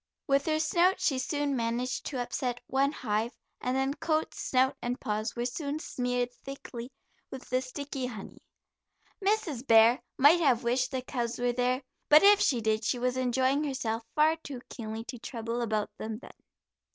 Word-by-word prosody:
With 275 +1 +2
her 310 0 +2
snout 355 +4 +3
she 265 -3 +1
soon 285 +1 -1
managed 240 +1 -2
to 265 - -3
upset 245 0 -2
one 275 +2 +1
hive, 225 -3 -2 0.2
and 250 +1 0
then 270 +1 +1
coat, 310 +1 -1
snout 260 0 +1
and 245 +1 -2
paws 215 +1 -2
were 240 0 -2
soon 285 +3 -3
smeared 245 -5 -2
thickly 260 -2 -8 0.4
with 265 -1 -9
the 255 0 +2
sticky 270 0 -5
honey. 215 -5 -9 0.8
Mrs. 385 - 0
Bear 230 +2 +6 0.2
might 295 +6 +7
have 265 -7 +3
wished 245 +2 +1
the 260 -1 -3
cubs 240 -2 -3
were 245 0 0
there, 250 +2 0 0.3
but 300 +3 +8
if 405 0 +8
she 245 -5 +2
did 220 0 +1
she 245 - 0
was 250 +1 0
enjoying 260 +3 +1
herself 245 -6 -2
far 310 +1 +4
too 285 -5 -8
keenly 220 -1 -6
to 245 0 -8
trouble 230 0 -4
about 215 -3 -1
them 220 0 -4
then. 250 - -13
255 Hz, 175 wpm, -29 LUFS, 235-280 Hz, 0.8 s, but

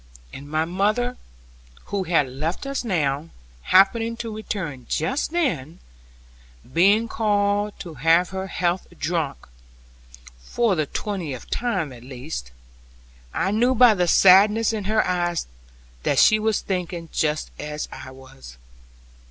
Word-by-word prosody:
And 145 +1 -9
my 155 +1 0
mother, 210 +8 0 0.8
who 195 -2 0
had 165 -5 +2
left 155 - -4
us 275 -1 -3
now, 155 - -1 0.3
happening 225 - +3
to 230 -2 -5
return 165 - -5
just 260 - -1
then, 175 - -1 1.0
being 200 +7 +4
called 205 -1 0
to 170 -3 -8
have 165 +3 +3
her 190 0 -4
health 180 -1 -1
drunk 160 -5 -2 0.9
(for 225 - 0
the 155 -5 -1
twentieth 170 - -5
time 190 - -1
at 120 - -13
least), 125 - -7 0.8
I 190 - -1
knew 240 +5 +2
by 245 -1 +7
the 180 -3 0
sadness 205 +6 +6
in 210 -3 -3
her 215 +2 +2
eyes 175 -2 -1 0.6
that - - 0
she 215 - +6
was 220 -1 0
thinking 175 -3 -4
just 155 0 -1
as 150 0 -5
I 130 0 -9
was. 130 - -14
180 Hz, 130 wpm, -23 LUFS, 150-215 Hz, 1.0 s, by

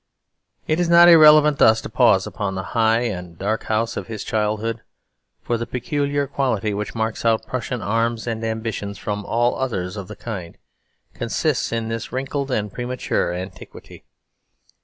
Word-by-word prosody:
It 155 +2 0
is 175 -1 +1
not 170 0 +8
irrelevant 150 -3 +7
thus 110 0 +6
to - - -6
pause - - +3
upon 100 -2 -4
the 95 - -3
high 115 0 +3
and 90 -8 -4
dark 105 +5 -2
house 110 +1 -1
of - - -5
his 110 -3 -6
childhood. 110 +1 -1 0.6
For 120 -1 -1
the 115 - -4
peculiar 140 +3 -1
quality 110 -7 -1
which 105 +3 -4
marks 110 -1 -2
out 110 -1 +2
Prussian 125 0 -4
arms 115 +2 0
and 115 -1 -3
ambitions 110 -2 -3
from 105 0 -4
all 120 +3 +1
others 95 -8 -2
of 100 -2 -6
the 105 - -9
kind 95 -7 -7 0.6
consists - - -1
in 115 -1 -2
this 115 -1 -4
wrinkled 135 +2 -3
and 105 -5 -2
premature 120 -7 -2
antiquity. 90 +1 -9
115 Hz, 160 wpm, -21 LUFS, 105-125 Hz, 0.6 s, not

